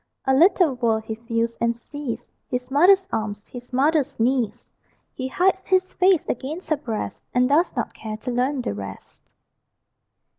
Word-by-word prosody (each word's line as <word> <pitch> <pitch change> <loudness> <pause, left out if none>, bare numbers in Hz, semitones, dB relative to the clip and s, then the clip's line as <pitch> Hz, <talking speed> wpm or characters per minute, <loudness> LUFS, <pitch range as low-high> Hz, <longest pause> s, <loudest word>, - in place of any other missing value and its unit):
A 265 - +3
little 335 +1 +5
world 230 -3 0
he 220 - -4
feels 230 +1 -1
and 235 0 +2
sees: 245 -2 -7 0.2
His 250 0 -4
mother's 375 +7 +5
arms, 205 -1 -3
his 245 0 -11
mother's 285 +1 +1
knees; 240 -2 0 0.5
He 260 - -4
hides 380 +7 +1
his 370 0 +2
face 370 -2 +3
against 310 +9 -4
her 310 - +3
breast, 230 -7 -5
And 250 0 +4
does 305 +6 +2
not - - -2
care 215 -1 -6
to 250 +3 -5
learn 255 +2 0
the - - -2
rest. 100 -1 -9
255 Hz, 160 wpm, -23 LUFS, 230-310 Hz, 0.5 s, little